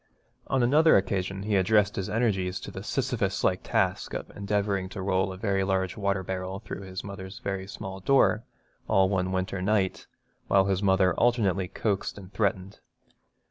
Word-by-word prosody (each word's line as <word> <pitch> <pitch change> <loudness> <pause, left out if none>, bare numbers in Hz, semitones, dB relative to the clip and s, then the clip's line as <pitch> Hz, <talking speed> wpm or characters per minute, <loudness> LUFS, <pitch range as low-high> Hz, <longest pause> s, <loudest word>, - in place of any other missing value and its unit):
On 135 -2 +1
another 150 +6 +6
occasion 95 0 -1
he 105 0 0
addressed 105 +1 +3
his 95 - -3
energies 95 -4 0
to - - -7
the - - -7
Sisyphus - - -1
like - - +2
task - - 0
of - - -5
endeavouring 100 -2 -1
to 100 - -7
roll 95 0 +1
a 95 - -7
very 100 -1 0
large 95 -1 0
water 100 -2 -1
barrel 95 +1 -4
through 100 -2 -7
his 95 -1 -6
mother's 100 -1 -8
very 95 -1 -4
small 95 -1 -7
door, 115 0 +3 0.4
all 95 -1 +4
one 95 -1 0
winter 95 0 -2
night, 95 -1 0 0.4
while 95 -1 +4
his 95 -1 0
mother 95 -2 +3
alternately 100 -6 +2
coaxed 100 +1 -2
and 95 -1 -11
threatened. 100 -2 -1
95 Hz, 170 wpm, -27 LUFS, 95-105 Hz, 0.4 s, another